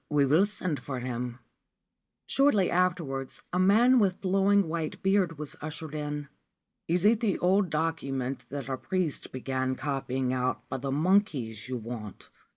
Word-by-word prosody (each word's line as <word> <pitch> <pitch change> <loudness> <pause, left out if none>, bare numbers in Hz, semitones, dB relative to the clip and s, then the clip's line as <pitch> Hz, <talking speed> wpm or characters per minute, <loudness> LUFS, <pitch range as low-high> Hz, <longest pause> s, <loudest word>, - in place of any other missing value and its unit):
We 145 -1 +3
will 160 +9 +4
send 185 -7 -2
for 130 -3 -5
him/ 120 -1 -4 0.9
Shortly 275 -9 +3
afterwards 165 -7 -1
a 180 - +1
man 230 +7 +5
with 190 -4 +2
flowing 195 0 +3
white 160 -1 -4
beard 190 -4 +2
was 150 -1 -6
ushered 155 0 -6
in. 150 -1 -4 0.3
' - - -57 0.2
Is 175 +3 +1
it 220 +1 +5
the 220 -5 +1
old 190 +1 +2
document 140 -5 -2
that 140 -1 -5
a 130 -1 -2
priest 180 -3 -2
began 130 0 -2
copying 130 -2 -2
out 130 0 -1
for 130 - -4
the 135 +1 -3
monkeys 140 - +1
you 130 - -2
want 110 -3 -8
150 Hz, 160 wpm, -28 LUFS, 130-185 Hz, 0.9 s, man